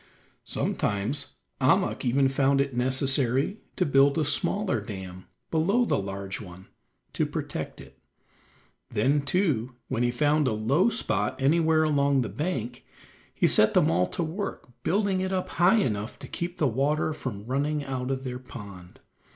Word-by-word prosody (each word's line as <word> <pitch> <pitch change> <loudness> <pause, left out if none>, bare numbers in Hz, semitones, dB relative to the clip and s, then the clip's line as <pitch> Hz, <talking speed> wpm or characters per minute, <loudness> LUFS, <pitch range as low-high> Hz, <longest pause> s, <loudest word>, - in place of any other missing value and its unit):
Sometimes 105 +8 -1 0.3
Ahmuk - - +2
even 135 +2 +3
found 135 +1 +2
it 140 -2 0
necessary 130 - +1 0.2
to 180 - +1
build 140 0 +4
a 155 - +1
smaller 185 - 0
dam 95 -3 -8 0.2
below 195 +10 +2
the - - +1
large 95 0 -5
one 95 -2 -11 0.5
to - - 0
protect - - -4
it. 65 0 -14 0.9
Then, 135 +7 +2
too, 140 - 0
when 125 -3 -1
he 120 - +2
found 145 +3 +2
a 110 - +1
low 135 - +2
spot 105 - 0
anywhere 160 +3 +3
along 140 -3 +2
the 120 - -3
bank, 130 -7 -3 0.5
he - - 0
set - - +5
them - - +4
all 90 - +2
to 170 - -3
work 180 -1 -5
building 195 0 +1
it 190 0 -2
up 185 -1 -2
high 175 +6 +4
enough 110 - -1
to - - -10
keep 175 +1 -5
the 150 - +2
water 145 +6 0
from 110 -8 -6
running 145 +4 -1
out 130 -1 -3
of 135 -1 -2
their 125 -1 -5
pond. 100 -8 -11
135 Hz, 160 wpm, -27 LUFS, 115-155 Hz, 0.9 s, set